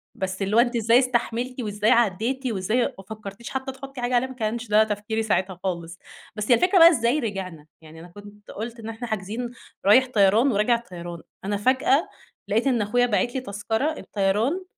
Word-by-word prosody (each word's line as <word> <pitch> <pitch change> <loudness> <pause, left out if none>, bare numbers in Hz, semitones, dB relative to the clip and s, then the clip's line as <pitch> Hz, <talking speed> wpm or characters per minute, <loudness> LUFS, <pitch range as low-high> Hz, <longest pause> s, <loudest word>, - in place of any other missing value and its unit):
بس 190 0 -4
اللي 195 +2 0
هو - - +6
أنتِ 240 0 +2
إزاي 230 +2 +4
استحملتي 250 0 -1
وإزاي 210 0 0
عدّيتي 240 +4 +1
وإزاي 215 +4 0 0.2
ما 195 - -11
فكّرتيش 215 +1 -8
حتّى 265 0 -4
تحُطّي 270 -1 -9
حاجة 245 +1 0
عليه؟ 245 +2 +2
ما 260 - -9
كانش 230 0 -3
ده 210 +1 +5
تفكيري 220 +1 -2
ساعتها 190 -4 -1
خالص. 170 -2 -4 0.4
بس 215 +3 -2
هي - - +8
الفكرة 360 - +3
بقى 335 0 +10
إزاي 245 -2 +1
رجعنا؟ 190 - -5 0.2
يعني 160 +1 -13
أنا 170 - -11
كنت 205 +3 -14
قُلت 230 +2 -6
إن 225 0 -7
إحنا 225 +2 -6
حاجزين 220 +3 -4 0.3
رايح 255 +6 +6
طيران 215 +6 +4
وراجع 210 +3 +2
طيران. 175 -6 -9 0.2
أنا 205 0 -1
فجأة 260 - +2 0.4
لقيت 225 +6 +1
إن 240 -4 +2
أخويا 245 +4 +2
باعت 240 +2 0
لي 260 - -1
تذكرة 225 +7 -2
الطيران، 215 - 0
225 Hz, 190 wpm, -24 LUFS, 200-245 Hz, 0.4 s, بقى